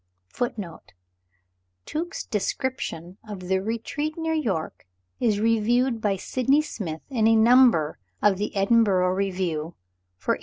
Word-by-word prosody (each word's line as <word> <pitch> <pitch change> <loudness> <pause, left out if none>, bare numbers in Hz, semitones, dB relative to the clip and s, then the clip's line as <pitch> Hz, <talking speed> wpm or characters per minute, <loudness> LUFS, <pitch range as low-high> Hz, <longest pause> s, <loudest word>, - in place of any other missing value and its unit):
(1) 245 - -1
(1) 180 -7 -7 1.1
Tuke's 345 +4 -4
Description 195 -4 -3
of 200 -3 -6
the 190 0 +2
Retreat 230 - -3
near 325 0 -1
York 195 - -2 0.3
is 215 -4 +1
reviewed 230 +2 +2
by 205 -2 +1
Sydney 265 +9 +1
Smith 165 - -6
in 225 -4 +2
a 225 - +5
number 225 - +5 0.2
of 195 -2 +3
the 210 - -3
"Edinburgh 195 -3 +3
Review," 180 -4 -2 0.4
for - - -1
1814. - - -5
215 Hz, 130 wpm, -25 LUFS, 185-245 Hz, 1.1 s, a